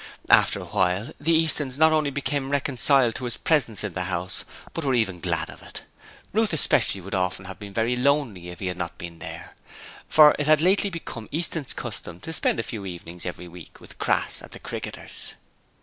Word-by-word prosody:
After - - +6
a - - -7
while, 95 +4 0
the 155 +4 +1
Eastons 155 -5 +2
not 160 +1 +6
only 155 -2 +2
became 140 0 -2
reconciled 135 -3 +3
to 130 - -5
his 120 - -3
presence 125 -11 +1
in 100 -4 -3
the 90 0 -2
house, 90 0 -2 0.3
but 165 - -3
were 135 -2 +2
even 100 -7 0
glad - - -1
of - - -14
it. - - -9 0.5
Ruth 220 -2 +2
especially 120 -9 +3
would 100 +3 -8
often 95 0 -1
have 95 0 -8
been 100 -1 -8
very 115 +2 +1
lonely 125 -9 +1
if 90 - -9
he 95 - -4
had 90 0 -2
not 85 -1 -4
been 85 -1 -8
there, - - -8 0.6
for 150 -1 +8
it 145 - 0
had 155 -1 +6
lately 190 +4 +3
become 145 - -7
Easton's 160 -3 -1
custom 85 - -6
to 160 - -6
spend 145 - +1
a - - 0
few 110 -3 -6
evenings 85 -1 -7
every 90 0 -6
week 85 -1 -12
with - - -13
Crass - - +1
at - - -12
the - - -9
Cricketers. - - -6
120 Hz, 205 wpm, -25 LUFS, 90-150 Hz, 0.6 s, for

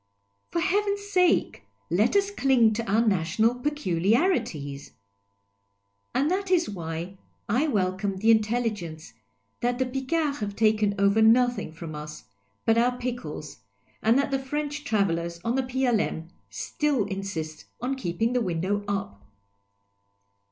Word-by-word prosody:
For 340 - -1
heaven's 405 +3 +1
sake, 360 - +2 0.3
let 210 - +2
us 400 0 +3
cling 260 - +3
to 220 -2 -3
our 225 +2 +3
national 200 +4 +2
peculiari 245 - +1
ties! 140 -2 -8 1.2
And 290 +5 +2
that 390 +1 -1
is 345 -2 +3
why 170 0 -5 0.3
I 255 +9 +2
welcome 195 -4 0
the 220 +4 +4
intelligence 215 - -1 0.5
that 245 0 0
the 260 - +1
Picards 280 +3 -1
have 205 -2 -4
taken 215 -2 +2
ov^er 200 +2 +3
nothing 245 -3 +3
from 160 0 -8
us 150 -2 -8 0.4
but 225 0 +4
our 245 +1 +2
pickles, 240 - -5 0.4
and 225 +3 +4
that 280 0 +1
the 270 - +1
French 290 +2 -3
travellers 170 -7 0
on 230 - +1
the 265 - +2
P.L.M. 245 -10 0 0.2
still 290 -7 -1
insist 190 -6 -5
on 250 +3 -1
keeping 225 0 -1
the 250 - +2
window 190 +2 -1
up. 195 - -3
225 Hz, 135 wpm, -26 LUFS, 185-265 Hz, 1.2 s, the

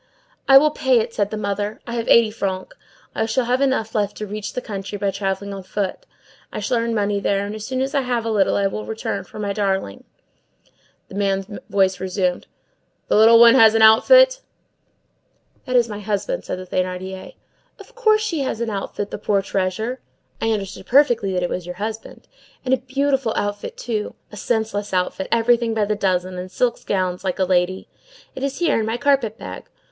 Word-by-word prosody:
"I 270 - +9
will 300 +2 +5
pay 265 -4 +2
it," 230 +1 -3
said 205 -1 0
the 215 - -4
mother. 205 +1 -3
"I 235 - -6
have 230 -1 -3
eighty 230 -2 +5
francs. 190 -3 -4 0.4
I 220 - -1
shall 240 +3 0
have 250 +3 +1
enough 260 -5 0
left 205 -2 -1
to 215 - -4
reach 210 +1 -6
the - - -2
country, 205 -3 -6
by 200 0 -1
travelling 195 0 -3
on 195 - -6
foot. 190 +1 -4 0.4
I - - -5
shall 250 - 0
earn 230 0 -1
money 205 -1 0
there, 200 0 0
and 205 - -5
as 215 0 -7
soon 260 0 -2
as 270 +1 -2
I 280 - +2
have 245 -3 -2
a 225 - -1
little 200 -3 +2
I 200 - +1
will 195 +2 -2
return 220 0 -4
for - - -13
my 205 -1 -2
darling." 195 - -2 1.0
The - - -12
man's 195 -1 0 0.2
voice 190 -1 +2
resumed:— 185 -1 -2 0.6
"The - - +3
little 225 +2 +7
one 235 0 +9
has 225 -4 +6
an 225 - +4
outfit?" - - +6 1.3
"That 255 - -1
is 240 -1 +4
my 210 -2 -6
husband," 215 - -3
said - - -4
the 185 - -8
Thénardier. 185 +1 -4 0.4
"Of - - -15
course 435 -3 +3
she 345 -8 -2
has 265 -5 -2
an 235 -1 -2
outfit, 205 0 -4
the - - -5
poor 200 -1 +1
treasure.—I 220 +5 -4
understood 200 -3 -3
perfectly 240 -7 +3
that 180 -1 0
it 175 - -1
was 180 -1 -4
your 180 - -6
husband.—And 220 +5 -6
a - - +4
beautiful 265 -1 -1
outfit, 205 0 -3
too! 220 -3 -3 0.2
a - - -10
senseless 210 -3 -2
outfit, 185 +1 -1
everything 235 0 +2
by 215 -2 +1
the 210 +1 -1
dozen, 185 -2 -1
and 185 +1 -7
silk 240 +1 -1
gowns 185 -2 -1
like 185 -2 -2
a 190 - +1
lady. 185 +1 0 0.5
It - - -8
is 275 0 -2
here, 340 -8 +2
in 220 - -1
my 225 +2 -1
carpet 250 -5 +1
bag." - - -9
215 Hz, 200 wpm, -21 LUFS, 195-240 Hz, 1.3 s, I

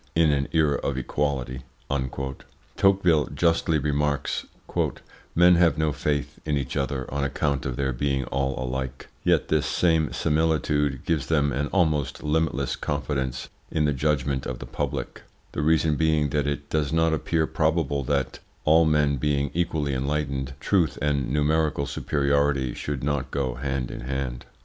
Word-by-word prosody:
"In 80 -2 +4
an 70 -1 0
era 75 -3 +3
of 70 - -2
equality," 65 -1 -2 1.1
Tocqueville 90 -6 +3
justly 85 -1 +2
remarks, 75 -1 -1 0.9
"men 90 +1 +7
have 85 -4 +4
no 80 -1 +1
faith 75 0 -2
in 75 -2 0
each 65 -2 -3
other 70 -2 -1
on 70 0 0
account 70 -1 -1
of 65 - -3
their 65 0 -1
being 70 +2 0
all 65 +1 -1
alike; 65 0 -4
yet - - +2
this - - +2
same 80 -3 +2
similitude 75 -3 +1
gives 80 -5 0
them 70 -4 +2
an 70 +3 -1
almost 75 -8 0
limitless 80 +1 0
confidence 70 -3 -3 0.2
in 75 - +1
the 75 - +2
judgment 70 -1 0
of 60 - -4
the - - -8
public, - - -4 0.3
the - - -2
reason 80 -1 +3
being 80 -2 +2
that 75 0 0
it 70 0 -3
does 75 -2 0
not 80 0 +3
appear 80 +1 +1
probable 75 -3 0
that, 70 +1 -1 0.3
all 80 +2 +6
men 75 -2 +2
being 70 +1 0
equally 80 -4 0
enlightened, 70 -1 -2
truth 80 -4 +1
and 70 -3 0
numerical 75 0 +1
superiority 70 -2 +1
should 70 -3 -4
not 70 -2 -1
go 70 -3 -1
hand 65 0 -3
in - - -6
hand." 65 -1 -4
70 Hz, 155 wpm, -25 LUFS, 65-80 Hz, 1.1 s, men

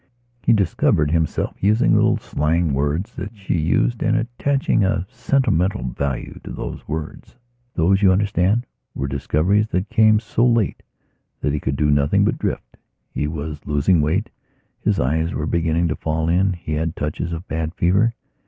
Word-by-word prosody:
He - - +2
discovered 85 -7 +2
himself 80 -2 -1
using 105 +4 +3
little - - +3
slang 80 +1 0
words 75 +8 -1
that 105 +2 -6
she 100 -2 -3
used 85 +9 +1
and 110 0 +2
attaching 120 0 0
a 95 -1 0
sentimental 115 - +1
value 70 0 -4
to - - -9
those - - -6
words. 80 +7 -6 0.4
These, 95 +4 +3
you 95 -2 +6
understand, 100 +4 +1 0.3
were 70 - -2
discoveries 80 +10 +1
that 95 -1 -2
came 110 -1 +5
so 110 +1 -1
late 115 -5 +2 0.6
that 70 - 0
he 75 - -1
could 65 0 -2
do 75 +1 +2
nothing 70 0 +3
but - - 0
drift. - - -4 0.3
He 75 - -2
was 75 -1 -5
losing 75 +3 +2
weight; 85 +9 0 0.5
his - - 0
eyes 80 +6 0
were 75 - -2
beginning 85 +1 +1
to 75 - -1
fall 80 0 -2
in; 95 +3 +2
he 85 -3 -6
had 80 +2 -1
touches 75 +3 -3
of 85 +2 -6
bad 80 +1 -3
fever. 100 +7 +2
85 Hz, 165 wpm, -21 LUFS, 75-105 Hz, 0.6 s, you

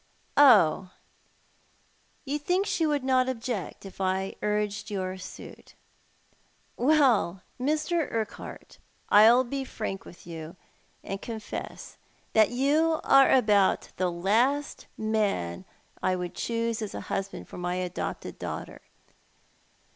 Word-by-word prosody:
" - - -38 0.2
Oh, 185 0 +1 1.3
you 290 +2 -2
think 360 +6 +1
she 325 -5 0
would 290 -3 0
not 260 -1 +2
object 230 -6 -4
if 195 0 -9
I 190 +1 0
urged 210 0 -1
your 190 -2 -3
suit. 185 - -11 1.0
Well, 245 - +3 0.2
Mr. 305 +4 0
Urquhart, 220 -2 -6 0.3
I'll 225 +5 +7
be 270 +2 -4
frank 215 -6 -5
with 175 - -14
you, 165 0 -8 0.5
and 195 0 -5
confess 220 -2 -7 0.3
that 220 -1 +5
you 300 +6 +2
are 275 0 +6
about 210 -6 +3
the 180 -1 0
last 230 +12 0
man 205 - -1 0.4
I 185 - +1
would 180 -1 -4
choose 230 -1 -2
as 215 - -5
a - - -4
husband 195 0 -4
for - - -9
my 180 0 -2
adopted 180 +1 -4
daughter. - - -6
215 Hz, 120 wpm, -27 LUFS, 190-265 Hz, 1.3 s, I'll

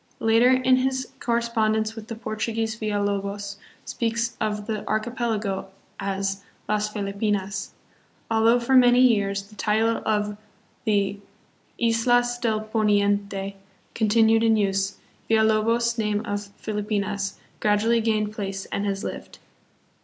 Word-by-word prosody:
Later 225 +2 +4
in 255 0 +4
his 260 0 -1
correspondence 220 -2 0
with 220 -1 -9
the 230 - -5
Portuguese 220 0 -2
Villalobos 200 -2 -2 0.3
speaks 230 0 -1
of 210 -1 -1
the 215 -1 -3
archipelago 215 -4 -1 0.3
as 195 0 -2 0.2
Las 210 0 0
Felipinas. 200 -1 -2 0.6
Although 225 +2 +4
for 240 +2 -1
many 245 -1 +6
years 200 -5 +3
the 205 +2 -17
title 220 +3 +1
of 210 -1 0 0.5
the 200 -2 +1 0.6
Islas 240 +1 +2
del 220 -3 0
Poniente 205 -2 0 0.4
continued 225 0 +4
hi 230 - +3
use, 195 -2 +1 0.3
Villalobos' 225 +2 +2
name 210 0 0
of 205 0 -3
Filipinas 205 -1 -2 0.2
gradually 215 +3 +2
gained 215 -1 0
place 195 -2 -4
and 200 +1 -1
has 195 +1 -2
lived. - - -7
215 Hz, 115 wpm, -24 LUFS, 205-230 Hz, 0.6 s, many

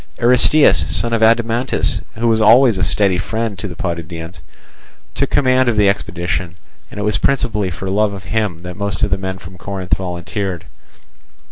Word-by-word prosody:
Aristeus, 125 +5 +5
son 120 0 -1
of 115 - 0
Adimantus, 115 +2 +1 0.2
who 120 +1 0
was 110 -1 +2
always 115 -1 +5
a - - 0
steady 95 -3 +1
friend 110 +2 -3
to 105 - -3
the 85 - -8
Potidæans, 85 0 -6 0.7
took - - -1
command 130 -2 +2
of 115 - -1
the 105 -1 +4
expedition, 90 -3 -2 0.3
and - - -9
it - - -2
was 105 +1 0
principally 110 -8 0
for 90 +2 -6
love 105 +2 +1
of 95 -1 -8
him 95 -4 -2
that 90 0 -7
most 100 0 -2
of - - +1
the 95 - +2
men 95 0 -4
from 90 0 -13
Corinth 95 -3 -2
volunteered. 90 0 -5
100 Hz, 175 wpm, -17 LUFS, 90-115 Hz, 0.7 s, Aristeus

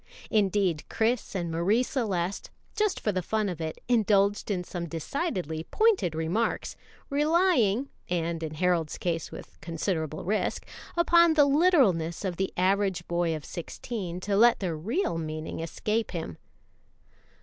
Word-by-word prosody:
Indeed, 195 -6 +2
Chris 225 -1 0
and 170 -3 -2
Marie 190 +9 +2
Celeste, 200 -8 -2 0.3
just 425 -3 +1
for 210 - 0
the 185 -2 -1
fun 215 +4 -1
of 170 -3 -5
it, 160 0 -4
indulged 205 -4 +2
in 185 -3 -1
some 175 -1 -5
decidedly 165 - -3
pointed 430 - +2
remarks, 170 +9 -1 0.4
relying 290 - +3 0.2
(and 170 -1 -1
in 155 -1 -4
Harold's 170 -2 +1
case 165 -2 -2
with - - -11
considerable 160 -2 -2
risk 210 +4 -1 0.2
) - - -17
upon 340 -1 +5
the 295 -2 +6
literalness 265 - +3
of 180 -3 -2
the 190 0 -1
average 190 0 +1
boy 170 -1 0
of 155 - -7
sixteen 180 +1 -5
to 200 +1 -1
let 235 +3 +5
their 180 -5 -2
real 210 - -1
meaning 155 0 -5
escape 210 +7 -2
him. 160 - -5
190 Hz, 145 wpm, -28 LUFS, 165-230 Hz, 0.4 s, the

